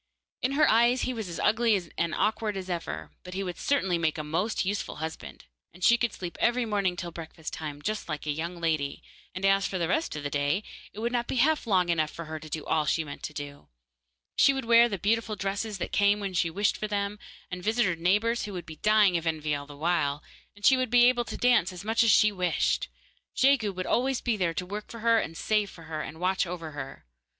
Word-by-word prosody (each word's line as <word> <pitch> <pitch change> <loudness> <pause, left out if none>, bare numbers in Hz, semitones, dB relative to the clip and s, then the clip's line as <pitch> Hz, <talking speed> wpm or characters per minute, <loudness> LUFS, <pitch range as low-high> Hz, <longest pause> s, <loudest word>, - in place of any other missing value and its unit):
In 260 +2 0
her 300 +1 +4
eyes 235 +3 +4
he 255 - -1
was 220 -6 -5
as 170 - -6
ugly 220 -2 +3 0.2
and 170 -1 -1
awkward 215 -1 0
as 185 -1 -5
ever, 170 -1 -4
but 180 0 -8
he 195 - -2
would 180 -2 -5
certainly 190 -12 +1
make 160 -2 0
a 155 - -3
most 165 +9 -1
useful 205 +2 -2
husband, 160 +1 -7 0.3
and 180 - -11
she 235 - +7
could 240 -1 0
sleep 175 -3 -7
every 240 0 +2
morning 200 -4 0
till 175 -1 -5
breakfast 160 -1 -8
time, 145 -2 -6
just 215 -4 -3
like 155 -1 -4
a 150 - 0
young 170 +4 -4
lady, 155 -4 -1 0.3
and 185 +1 -2
as 195 0 +3
for 190 - -3
the 170 -2 0
rest 315 - 0
of 150 - -5
the 145 - -3
day, 145 +7 0 0.3
it - - -18
would 235 +1 -1
not 240 -1 -1
be - - -3
half 295 +1 +2
long 185 -4 +3
enough 160 -2 +1
for 155 -1 -7 0.2
all 155 -1 +1
she 160 - +1
meant 145 -2 -9
to - - -5
do. 145 -1 -8 0.7
She 275 - +5
would 270 -3 -3
wear 235 +1 +6
the 200 - -2
beautiful 215 +3 0
dresses 200 +2 -3
that 180 - -4
came 205 0 +3
when 200 -2 -4
she 175 -1 +1
wished 205 +5 0
for 215 - -3
them, 205 0 -2 0.3
and 180 0 -5
visit 225 +5 +2
her 180 - +1
neighbours, 210 +8 +1
who 205 - -7
would 180 -2 -6
be 160 -1 -10
dying 210 -4 +4
of 165 0 -4
envy 155 -2 -1
all 145 0 -4
the 145 -1 -11
while, 150 -3 0 0.3
and 205 - -7
she 265 - +7
would 255 -1 0
be 245 +1 +6
able 245 -1 +3
to - - -6
dance 245 -8 +3
as 180 +1 -9
much 225 +2 +2
as 230 - +4
she 215 0 +6
wished. 180 -4 0 0.5
Jegu 260 -6 +3
would 185 -1 -5
always 260 +1 +1
be 240 -3 0
there 175 -5 -1
to 180 - -2
work 205 +3 -6
for 230 - -9
her 230 0 +4
and 165 -4 -4
save 210 -2 +1
for 165 - -13
her, 155 -1 -5
and 160 +1 -7
watch 185 +1 +1
over 165 -2 -6
her. 135 - -8
190 Hz, 240 wpm, -28 LUFS, 165-225 Hz, 0.7 s, she